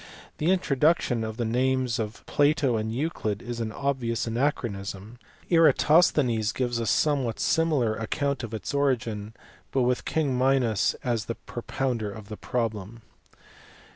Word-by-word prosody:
The 155 - +1
introduction 150 -8 +2
of 110 0 -5
the 120 - -1
names 125 +1 +1
of 110 0 -5
Plato 145 -3 +2
and 110 0 -2
Euclid 115 -6 -2
is 120 -1 -5
an 110 -1 -2
obvious 125 -2 -1
anachronism. 115 -4 -3 0.3
Eratosthenes 150 -9 +4
gives 120 -2 -1
a 115 - -2
somewhat 135 0 +1
similar 150 -9 +2
account 140 +5 -2
of 115 - -5
its 110 +3 -5
origin, 115 -6 -1 0.4
but 130 - +2
with 125 0 +1
king 145 -5 0
Minos 125 -4 +2
as 115 -3 -1
the 115 - -4
pro 120 - -8
pounder 120 -5 -2
of 105 0 -10
the 105 - -6
problem. 110 -2 -3
120 Hz, 140 wpm, -26 LUFS, 110-140 Hz, 0.4 s, Eratosthenes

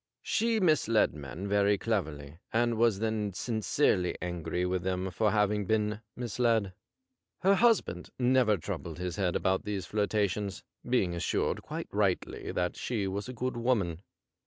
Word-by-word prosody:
She 230 0 +1
misled 155 - +3
men 75 +6 -6
very 100 0 +3
cleverly, 80 -9 -3
and 120 +1 +2
was 115 -2 +3
then 110 -2 -1
sincerely 110 -2 +1
angry 90 0 -2
with 90 0 0
them 95 +1 -2
for 110 +3 +2
having 105 -1 +1
been 105 0 0
misled. 115 -4 0 0.7
Her 195 +2 +5
husband 200 - +2
never 125 -4 +3
troubled 85 -1 -5
his 90 +1 -4
head 90 -3 0
about 95 0 +1
these 100 -2 -3
flirtations, 105 -1 -1 0.3
being 100 -8 +2
assured 85 - -1
quite - - -6
rightly - - -1
that 90 0 -1
she 110 -5 -2
was 100 +4 -4
a - - -5
good 125 +1 -2
woman. 105 -9 0
105 Hz, 145 wpm, -30 LUFS, 90-115 Hz, 0.7 s, Her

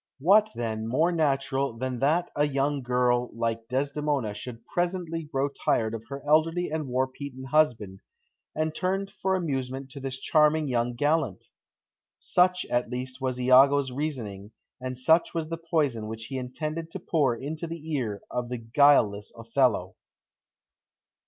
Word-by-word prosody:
What, 200 +9 +5
then, 110 -2 -3
more 155 +9 +2
natural 135 -5 0
than 130 0 -3
that 155 +7 +1
a 145 0 +2
young 140 0 0
girl 125 0 +1
like 115 0 -2
Desdemona 140 -2 -1
should 115 +2 -8
presently 175 -1 -2
grow 140 -2 -1
tired 115 -5 0
of 115 0 -7
her 140 0 -7
elderly 165 +3 +2
and 155 -2 -2
war 130 +1 +1
beaten 130 0 -8
husband, 125 -9 +1 0.6
and 155 0 -1
turn 190 +4 -1 0.2
for 190 0 +2
amusement 135 -5 -3
to 140 - -8
this 135 -1 -5
charming 150 +1 +3
young 120 -1 0
gallant? 145 - 0 0.7
Such, 180 0 +2
at 120 -1 -1
least, 130 +1 -5
was 130 -1 -2
Iago's 130 +2 +5
reasoning, 115 -8 -5 0.3
and 130 0 -4
such 160 +8 +3
was 160 -2 -2
the 165 - -3
poison 150 -10 0
which 110 +1 -6
he 135 +2 -5
intended 155 +6 -4
to - - -6
pour 140 -7 +1
into 155 +7 -5
the 160 -1 -6
ear 110 -8 -2
of 125 -1 -3
the 125 - -3
guileless 115 -4 +3
Othello. 115 -5 +1
135 Hz, 150 wpm, -27 LUFS, 125-155 Hz, 0.7 s, What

